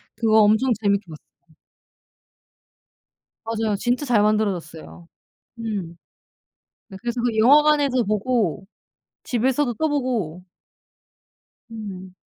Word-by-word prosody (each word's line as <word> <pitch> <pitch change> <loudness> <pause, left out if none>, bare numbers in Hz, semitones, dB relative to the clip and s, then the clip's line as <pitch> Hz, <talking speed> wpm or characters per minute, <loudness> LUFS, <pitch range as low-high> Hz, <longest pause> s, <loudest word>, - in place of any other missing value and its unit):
그거 220 -1 +3
엄청 220 +5 +3
재밌게 200 0 +1
봤어요. 155 +1 -16 1.9
맞아요. 225 -2 -1
진짜 245 +7 -1
잘 240 -6 +2
만들어졌어요. 180 -6 -2 0.5
음 200 -7 -5 0.9
네 195 -4 -10
그래서 240 0 -3
그 240 -2 0
영화관에서 285 +1 +4
보고 215 -3 -1 0.6
집에서도 255 +2 0
또 315 +6 -1
보고. 235 - -2 1.3
음. 195 -5 -9
220 Hz, 210 characters per minute, -22 LUFS, 195-245 Hz, 1.9 s, 영화관에서